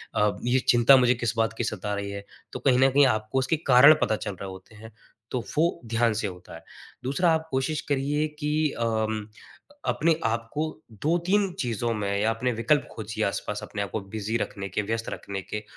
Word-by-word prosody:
अ, 105 0 +3
ये 125 +2 +2
चिंता 120 +3 +7
मुझे 125 0 +4
किस 120 -1 -1
बात 115 0 +1
की - - -1
सता 105 -2 -3
रही 100 0 -4
है? 100 0 -7 0.3
तो - - -4
कहीं 130 -2 +3
न 135 +1 +6
कहीं 140 +2 +5
आपको 110 +2 0
उसके 145 +5 0
कारण 140 +4 +8
पता 110 - +2
चल - - -1
रहे 100 - -5
होते 95 +3 -12
हैं, 110 +1 -12 0.4
तो 125 - -1 0.2
वो 170 +3 +2
ध्यान 115 0 +1
से 105 - -1
होता 90 -3 -10
है। 80 - -12 0.4
दूसरा 145 +7 +2
आप 160 0 -1
कोशिश 135 +3 -1
करिए 145 +2 0
कि 150 0 +1
अम 110 -2 -1 0.6
अपने 165 +1 +2
आपको 115 +6 -1 0.4
2-3 180 +5 +2
चीज़ों 120 -1 -1
में 105 -2 -2
या 110 - +2
अपने 115 +3 -1
विकल्प 140 +6 +1
खोजिए 110 0 -4
आस-पास 105 +1 -3
अपने 100 - -5
आपको 100 +2 -3 0.2
बिज़ी 110 +2 -1
रखने 100 -3 -4
के 95 - -1
व्यस्त 115 +2 -3
रखने 100 -1 -5
के। 105 +3 -6
115 Hz, 200 wpm, -26 LUFS, 105-140 Hz, 0.6 s, कारण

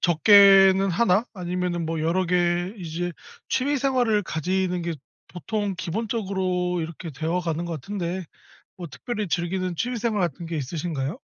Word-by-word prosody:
적게는 195 +2 +6
1 200 +3 +2
아니면은 180 -2 -2
뭐 165 -1 -2
여러 170 +4 +1
개 175 +1 +1
이제 175 0 -4 0.4
취미 285 +3 +1
생활을 245 -5 +2
가지는 180 +2 -1
게 170 0 -2 0.3
보통 205 +2 -3
기본적으로 185 -3 -2
이렇게 165 +1 -6
되어가는 165 +3 -2
것 170 - -4
같은데 180 +3 -4 0.5
뭐 180 - -7
특별히 210 - -4
즐기는 180 +1 -1
취미 245 +5 -2
생활 220 -2 -1
같은 170 0 -3
게 165 0 -4
있으신가요? 150 - -3
180 Hz, 315 characters per minute, -24 LUFS, 170-200 Hz, 0.5 s, 적게는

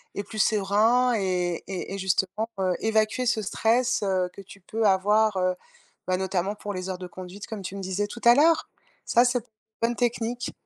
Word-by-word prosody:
et 200 - -3
plus 215 +2 -8
serein 220 +5 +3
et 180 -4 -1
et 190 0 -5
et - - -3
justement, 190 +3 0
heu, 185 -1 +1
évacuer 220 +3 +1
ce 230 -2 +1
stress, 230 +5 +1
heu, 185 -2 0
que - - -10
tu 195 +1 -14
peux 220 +5 -2
avoir, 210 +2 +3
heu, 185 0 +1 0.5
ben, 185 - +2
notamment, 190 +1 -1
pour 205 0 -6
les 185 0 -5
heures 185 - -3
de 180 0 -7
conduite, 185 +2 -9
comme 220 -3 -6
tu 190 +1 -6
me - - -5
disais 190 +2 -2
tout 235 +3 -9
à 235 0 +8
l'heure, 320 +3 +4 0.4
ça, 240 +1 +4
ça 245 0 +2
p 230 - -28 0.4
une 230 - +4
bonne 240 - -2
technique. 240 0 -1
205 Hz, 210 wpm, -26 LUFS, 190-225 Hz, 0.5 s, à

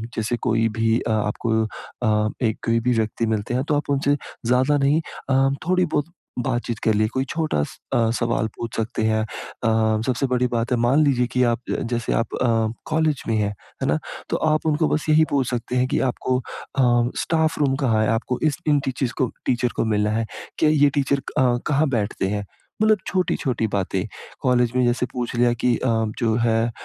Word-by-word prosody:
जैसे 115 +2 -1
कोई 115 0 +3
भी 115 +1 +2
अ, 115 - -2
आपको 110 +1 0
अ, 110 0 -1 0.2
एक 110 -1 0
कोई 115 0 +2
भी 125 +2 +2
व्यक्ति 110 +1 0
मिलते 110 +1 -1
हैं 130 +2 +1
तो 150 - +3
आप 145 - -2
उनसे 140 +1 +2 0.3
ज़्यादा 130 +4 +3
नहीं 145 +3 +3 0.3
अ, 135 0 +4 0.2
थोड़ी 180 0 +3
बहुत 150 -1 0 0.4
बातचीत 120 -3 -2
कर 110 - +3
ली, 110 +1 +2
कोई 130 +4 -2
छोटा 155 - 0
स - - -8 0.2
अ, 115 -1 +3
सवाल 115 -1 0
पूछ 115 -1 -5
सकते 115 0 -2
हैं। 110 0 +2
अ, 110 0 -1
सबसे 130 +1 +1
बड़ी 125 0 +2
बात 115 0 -2
है 125 - +3
मान 130 +6 +4
लीजिए 125 -3 +2
की 125 - +4
आप 120 -2 +2
ज - - -1
जैसे 120 -1 -1
आप 115 - -1
अ, 125 - +3 0.4
कॉलेज 155 -3 +1
में 115 - +2
है, 105 -1 +1 0.3
है - - 0
ना? 75 +1 +2 0.3
तो - - 0
आप 155 +1 0
उनको 155 0 +2
बस 155 0 -1
यही 155 +1 +5
पूछ 135 -3 +1
सकते 120 0 -3
हैं 125 +1 +2
कि - - 0
आपको 125 +1 -1
अ, 135 +1 -5 0.4
स्टाफ 160 -1 +1
रूम 140 -3 +2
कहाँ 110 -3 +3
है? 110 - +1
आपको 120 +2 -1
इस 150 - -1
इन 145 -1 +4
टीचिज़ 130 -1 -2
को 125 -3 0
टीचर 125 0 +1
को - - +1
मिलना 105 -1 +1
है। 115 +1 0 0.3
क्या 155 - +4
ये 145 -2 +4
टीचर 140 0 +1 0.2
अ, 125 -2 +3
कहाँ 150 0 +2
बैठते 110 -5 -1
हैं? 105 +1 -2 0.4
मतलब 215 -1 +5
छोटी-छोटी 140 - 0
बातें। 95 -2 -1 0.4
कॉलेज 125 -2 +2
में 125 - +3
जैसे 120 +1 +1
पूछ 125 -1 -3
लिया 120 0 +3
कि 120 +1 +1
अ, 130 - -2 0.3
जो 115 -2 +1
है 115 -1 +2
अ, - - -4
120 Hz, 210 wpm, -23 LUFS, 110-140 Hz, 0.4 s, यही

